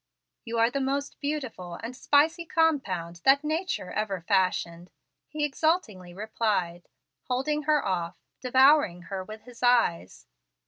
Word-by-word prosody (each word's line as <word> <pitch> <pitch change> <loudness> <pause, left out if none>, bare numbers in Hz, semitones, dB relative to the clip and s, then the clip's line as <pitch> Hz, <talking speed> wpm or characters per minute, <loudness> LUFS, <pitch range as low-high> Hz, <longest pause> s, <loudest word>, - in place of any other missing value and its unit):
"You 230 0 -4
are 230 +1 +3
the 275 - -2
most 280 +2 -2
beautiful 260 - -4
and 235 +3 -7
spicy 310 +6 +2
compound 205 - 0
that 275 +2 +5
nature 315 - -2
ever 205 -3 -2
fashioned," 180 -3 0 0.4
he 300 -1 -1
exultingly 270 - -1
replied, 200 -3 -2 0.4
holding 270 +4 -1
her 300 -1 +3
off, 175 -3 -2 0.2
devouring 260 - +4
her 190 -1 -3
with 215 +3 -10
his 245 -2 -15
eyes. 175 - +1
240 Hz, 130 wpm, -27 LUFS, 185-290 Hz, 0.4 s, that